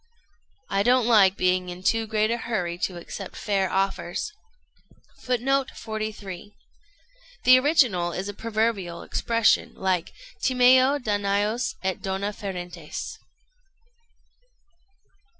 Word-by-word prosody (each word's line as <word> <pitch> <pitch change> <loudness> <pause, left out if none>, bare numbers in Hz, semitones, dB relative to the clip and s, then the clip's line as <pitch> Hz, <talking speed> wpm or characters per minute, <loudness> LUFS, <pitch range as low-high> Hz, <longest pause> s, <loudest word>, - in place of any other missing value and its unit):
"I 195 - 0
don't 245 +2 +3
like 200 -5 +5
being 185 0 +1
in 180 +1 -8
too 225 +2 +1
great 215 0 +1
a 235 - 0
hurry 180 -7 -3
to 180 -2 -2
accept 185 +3 -8
fair 195 -3 0
offers." 195 - -2 0.9
[Footnote 260 +2 +1
43: 215 -3 -6 0.9
The 255 0 +8
original 250 - +2
is 190 +3 -4
a 205 - -5
proverbial 215 -5 -2
expression 230 -1 +1
like 185 -3 -1 0.3
"Timeo 255 +2 +5
Danaos 210 +1 -1
et 190 -1 -2
dona 195 +2 -2
ferentes." 180 -6 -6
205 Hz, 105 wpm, -25 LUFS, 185-235 Hz, 0.9 s, The